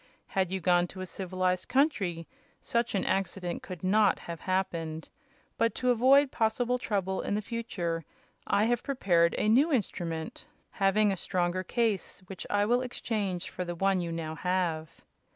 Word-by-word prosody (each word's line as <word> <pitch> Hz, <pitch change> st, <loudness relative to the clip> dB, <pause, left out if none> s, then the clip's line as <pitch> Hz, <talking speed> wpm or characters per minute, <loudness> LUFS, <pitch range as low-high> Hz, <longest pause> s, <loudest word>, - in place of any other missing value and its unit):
Had 190 Hz, -3 st, -1 dB
you 190 Hz, -, -1 dB
gone 175 Hz, 0 st, +3 dB
to 185 Hz, +1 st, -9 dB
a -, -, -3 dB
civilized 185 Hz, 0 st, -2 dB
country 200 Hz, -, +1 dB, 0.3 s
such 235 Hz, -2 st, -1 dB
an 195 Hz, -, 0 dB
accident 185 Hz, -2 st, -1 dB
could 185 Hz, -2 st, -8 dB
not 205 Hz, +2 st, +4 dB
have 170 Hz, -1 st, -7 dB
happened; 165 Hz, -4 st, -2 dB, 0.5 s
but 230 Hz, 0 st, +2 dB
to 250 Hz, -1 st, +2 dB
avoid 265 Hz, +4 st, +5 dB
possible 240 Hz, +2 st, +1 dB
trouble 195 Hz, -5 st, -1 dB
in 200 Hz, -, -1 dB
the -, -, +1 dB
future 180 Hz, -8 st, -3 dB, 0.4 s
I 200 Hz, +1 st, +3 dB
have 235 Hz, +1 st, +1 dB
prepared 175 Hz, -, +2 dB
a -, -, +1 dB
new 270 Hz, +9 st, +4 dB
instrument, 170 Hz, -, -2 dB, 0.2 s
having 200 Hz, +1 st, +3 dB
a -, -, 0 dB
stronger 175 Hz, +1 st, -1 dB
case, 205 Hz, -1 st, -1 dB
which 190 Hz, 0 st, -8 dB
I 205 Hz, 0 st, +2 dB
will 245 Hz, +3 st, +2 dB
exchange 210 Hz, -7 st, -3 dB
for 180 Hz, -, -4 dB
the 175 Hz, -1 st, -4 dB
one 195 Hz, +1 st, +2 dB
you 170 Hz, -1 st, -3 dB
now 165 Hz, -1 st, -4 dB
have." 165 Hz, -2 st, -1 dB
190 Hz, 165 wpm, -29 LUFS, 175-225 Hz, 0.5 s, avoid